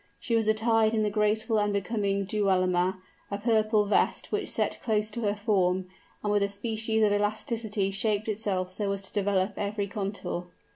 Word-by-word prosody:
She 235 Hz, -, -1 dB
was 225 Hz, -1 st, +2 dB
attired 220 Hz, 0 st, +3 dB
in 215 Hz, -, +2 dB
the 210 Hz, -, 0 dB
graceful 215 Hz, +1 st, +1 dB
and 205 Hz, 0 st, +1 dB
becoming 200 Hz, -1 st, -1 dB
dualma, 185 Hz, -2 st, +1 dB, 0.3 s
a 200 Hz, -, -2 dB
purple 215 Hz, -1 st, +2 dB
vest 205 Hz, -, +1 dB
which 420 Hz, 0 st, -1 dB
set -, -, -1 dB
close 215 Hz, -2 st, 0 dB
to 235 Hz, -, -4 dB
her 205 Hz, -2 st, 0 dB
form, 190 Hz, -3 st, +1 dB, 0.4 s
and 210 Hz, -, 0 dB
with 205 Hz, -, +3 dB
a 200 Hz, -, +1 dB
species 220 Hz, +2 st, -1 dB
of 205 Hz, -1 st, +4 dB
elasticity 210 Hz, -1 st, -1 dB
shaped 205 Hz, +1 st, +1 dB
itself 200 Hz, -4 st, -1 dB
so 200 Hz, +1 st, -2 dB
as 195 Hz, 0 st, -5 dB
to 190 Hz, -, -8 dB
develop 200 Hz, -1 st, +1 dB
every 205 Hz, 0 st, -1 dB
contour. 200 Hz, -3 st, -4 dB
210 Hz, 180 wpm, -28 LUFS, 200-220 Hz, 0.4 s, of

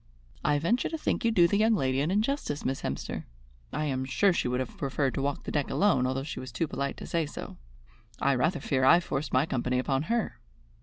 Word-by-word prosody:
"I 145 Hz, -, +3 dB
venture 190 Hz, +12 st, +1 dB
to 320 Hz, -, -3 dB
think 300 Hz, -, -1 dB
you 230 Hz, -, +3 dB
do 175 Hz, -6 st, +5 dB
the 200 Hz, +4 st, +1 dB
young 220 Hz, +1 st, +4 dB
lady 130 Hz, -6 st, +1 dB
an 150 Hz, -, 0 dB
injustice, 215 Hz, -, -1 dB
Miss 135 Hz, -, -1 dB
Hemster. 70 Hz, +2 st, -4 dB, 0.5 s
I 150 Hz, +2 st, -1 dB
am 130 Hz, -3 st, -1 dB
sure 130 Hz, -, +3 dB
she 170 Hz, -, 0 dB
would 125 Hz, +1 st, 0 dB
have 130 Hz, -, -4 dB
preferred 135 Hz, -2 st, -1 dB
to 135 Hz, -, -2 dB
walk 140 Hz, 0 st, -2 dB
the -, -, -5 dB
deck 145 Hz, -3 st, 0 dB
alone, 135 Hz, -11 st, +3 dB
although 130 Hz, +1 st, -1 dB
she 145 Hz, -, -5 dB
was 130 Hz, -1 st, -7 dB
too 135 Hz, +8 st, -1 dB
polite 140 Hz, 0 st, -3 dB
to -, -, -7 dB
say 165 Hz, -3 st, -1 dB
so. -, -, -8 dB, 0.6 s
I 140 Hz, -, +3 dB
rather 155 Hz, +6 st, +1 dB
fear 135 Hz, -1 st, 0 dB
I 170 Hz, +7 st, +7 dB
forced 155 Hz, -4 st, -3 dB
my 130 Hz, +3 st, +3 dB
company 125 Hz, -3 st, -1 dB
upon 135 Hz, +1 st, +1 dB
her." 235 Hz, -1 st, -1 dB
140 Hz, 235 wpm, -29 LUFS, 130-175 Hz, 0.6 s, I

